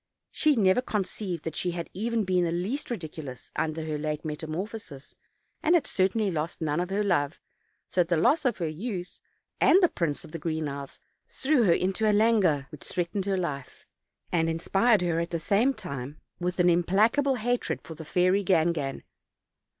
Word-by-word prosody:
She 305 -2 +3
never 195 0 +4
conceived 195 -6 -3
that 160 -2 -4
she 175 +2 -1
had 170 -1 -6
been 225 +1 -1
in 180 -1 +2
the 170 - 0
least 195 - -2
ridicu 160 -9 -5
lous 130 -3 -9
under 160 0 -2
her 155 -1 -3
late 150 +1 -3
metamorphosis, 155 0 -6 0.5
and 335 +3 +4
had 330 - +3
certainly 195 +2 +1
lost 160 0 -3
none 155 -1 0
of 180 +1 -2
her 200 +2 0
love, 165 -6 0 0.5
so 180 - +2
that 170 - 0
the 170 -1 +2
loss 300 - +3
of 250 -3 +1
her 170 - -1
youth, 180 +3 -5 0.4
and - - +5
of 385 - +7
the 350 - +6
Prince 155 -4 -2
of - - -13
the 165 - -5
Green 155 -1 -2
Isles, 140 -1 -7 0.3
threw 265 -4 +2
her 175 - +5
into 190 +5 +1
a - - +4
languor 205 -10 +3
which 150 - -11
threatened 180 +2 -2
her 195 -1 0
life, 140 -7 -5 0.5
and 165 -2 +2
inspired 195 +6 +2
her 170 -2 +1
at 170 +1 -2
the 170 - -2
same 205 - +3
time 145 - -7 0.2
with 180 +1 -2
an 180 - +5
implacable 215 - +3
hatred 245 +1 -1
for 160 - -8
the 160 0 -9
fairy 180 +5 +2
Gangan. 160 -6 +1
180 Hz, 190 wpm, -27 LUFS, 160-210 Hz, 0.5 s, of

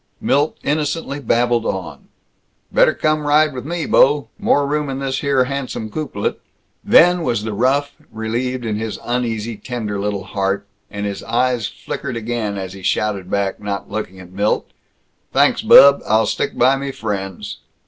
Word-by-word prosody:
Milt 145 +3 +1
innocently 150 -1 -1
babbled 120 -2 +1
on, 95 -4 -5 0.6
"Better - - +4
come 155 -1 0
ride 150 +1 +4
with 125 +1 -6
me, 170 -2 -2
bo'. 140 -3 +4
More 145 - +2
room 150 0 -1
in 135 - -3
this 135 -1 -2
here 140 -3 +2
handsome 130 -5 -4
coupelet." 135 -9 -3 0.4
Then 175 +1 +5
was 115 -9 -1
the 110 -1 -3
rough 135 +6 +1 0.2
relieved 120 +3 -3
in 105 -2 -1
his 110 0 -4
uneasy 115 -2 -2
tender 110 -5 -4
little 100 -1 -2
heart, 100 0 -2 0.2
and 100 0 -5
his 100 -1 -4
eyes 120 -1 0
flickered 130 -4 -6
again 110 -3 -3
as 95 -1 -5
he 95 - -10
shouted 100 -1 -1
back, 100 -1 -1
not 100 -1 -4
looking 95 -3 -5
at 90 -1 -12
Milt, 100 +3 -1 0.6
"Thanks, - - +3
bub, 140 0 +8
I'll 110 +1 +3
stick - - -2
by 135 +1 +4
me 140 0 -4
friends." 100 -6 -5
120 Hz, 160 wpm, -19 LUFS, 105-140 Hz, 0.6 s, bub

